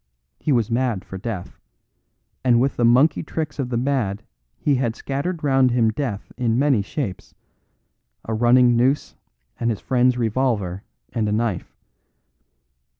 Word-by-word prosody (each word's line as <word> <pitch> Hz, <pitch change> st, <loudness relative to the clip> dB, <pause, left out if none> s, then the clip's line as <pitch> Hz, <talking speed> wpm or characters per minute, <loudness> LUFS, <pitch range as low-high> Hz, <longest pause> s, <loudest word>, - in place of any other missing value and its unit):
He 150 Hz, -, -1 dB
was 120 Hz, -4 st, +1 dB
mad 120 Hz, -5 st, 0 dB
for 95 Hz, -, -8 dB
death, 100 Hz, -4 st, -6 dB, 0.8 s
and 120 Hz, -2 st, +4 dB
with 135 Hz, +3 st, +1 dB
the 120 Hz, -, 0 dB
monkey 130 Hz, +6 st, +4 dB
tricks 155 Hz, -3 st, -4 dB
of 130 Hz, -3 st, -1 dB
the 120 Hz, -, -1 dB
mad 120 Hz, -5 st, -1 dB, 0.3 s
he 145 Hz, -, +1 dB
had 125 Hz, -4 st, 0 dB
scattered 150 Hz, +6 st, -3 dB
round 135 Hz, -2 st, +4 dB
him 120 Hz, -2 st, +2 dB
death 110 Hz, -4 st, -4 dB
in 115 Hz, -2 st, +1 dB
many 135 Hz, -5 st, +3 dB
shapes 100 Hz, -2 st, -5 dB, 0.9 s
a 110 Hz, -, -3 dB
running 120 Hz, +2 st, +4 dB
noose 130 Hz, +5 st, +1 dB, 0.4 s
and 115 Hz, -, 0 dB
his 110 Hz, -, -2 dB
friend's 125 Hz, -1 st, +2 dB
revolver 110 Hz, -6 st, 0 dB, 0.3 s
and 110 Hz, -3 st, 0 dB
a -, -, -1 dB
knife. 110 Hz, -4 st, -2 dB
120 Hz, 150 wpm, -22 LUFS, 110-135 Hz, 0.9 s, and